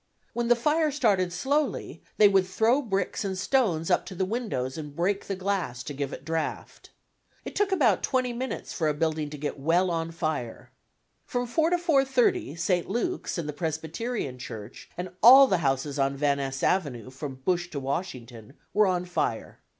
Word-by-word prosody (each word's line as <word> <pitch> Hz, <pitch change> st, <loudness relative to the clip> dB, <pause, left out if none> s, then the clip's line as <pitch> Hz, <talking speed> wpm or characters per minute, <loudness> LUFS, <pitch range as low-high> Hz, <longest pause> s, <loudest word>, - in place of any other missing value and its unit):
When 240 Hz, 0 st, -1 dB
the 240 Hz, -, +5 dB
fire 305 Hz, +6 st, +2 dB
started 205 Hz, -11 st, +1 dB
slowly, 280 Hz, +11 st, -1 dB, 0.2 s
they 210 Hz, -, +8 dB
would 195 Hz, -2 st, +3 dB
throw 225 Hz, +9 st, +2 dB
bricks 195 Hz, -7 st, -2 dB
and 190 Hz, -2 st, -3 dB
stones 185 Hz, -7 st, +1 dB
up 180 Hz, -, +3 dB
to 190 Hz, -, -7 dB
the 190 Hz, -, 0 dB
windows 190 Hz, -, -3 dB
and 150 Hz, -2 st, -7 dB
break 195 Hz, +4 st, 0 dB
the 195 Hz, -, -2 dB
glass 185 Hz, -10 st, -2 dB
to 135 Hz, -, -6 dB
give 140 Hz, -1 st, -3 dB
it 135 Hz, -, -8 dB
draught. 160 Hz, -1 st, -4 dB, 0.6 s
It -, -, -7 dB
took 410 Hz, -1 st, +1 dB
about 250 Hz, -, +3 dB
20 255 Hz, -2 st, 0 dB
minutes 255 Hz, +2 st, -4 dB
for 160 Hz, -, 0 dB
a 150 Hz, -, +1 dB
building 155 Hz, -1 st, -1 dB
to 150 Hz, -, -7 dB
get 145 Hz, 0 st, -4 dB
well 175 Hz, +5 st, +2 dB
on 165 Hz, -1 st, -2 dB
fire. 155 Hz, -8 st, -4 dB, 0.5 s
From 245 Hz, 0 st, -2 dB
4 315 Hz, +7 st, +1 dB
to 355 Hz, -, +2 dB
4:30 270 Hz, -, +2 dB
St. 175 Hz, +1 st, 0 dB
Luke's 240 Hz, -, -2 dB
and 165 Hz, -3 st, -3 dB
the 150 Hz, -, -3 dB
Presbyterian 160 Hz, -, -3 dB
Church 110 Hz, -3 st, -9 dB
and 180 Hz, 0 st, -5 dB
all 265 Hz, +5 st, +10 dB
the 190 Hz, -8 st, +1 dB
houses 140 Hz, -1 st, -1 dB
on 135 Hz, 0 st, +1 dB
Van 140 Hz, 0 st, +2 dB
Ness 135 Hz, -1 st, -4 dB
Avenue 130 Hz, -, 0 dB
from 135 Hz, 0 st, -6 dB
Bush 175 Hz, +6 st, -1 dB
to 150 Hz, -, -4 dB
Washington 130 Hz, -, -5 dB, 0.2 s
were 210 Hz, -1 st, +4 dB
on 180 Hz, -1 st, 0 dB
fire. 165 Hz, -10 st, -2 dB
180 Hz, 185 wpm, -27 LUFS, 145-235 Hz, 0.6 s, all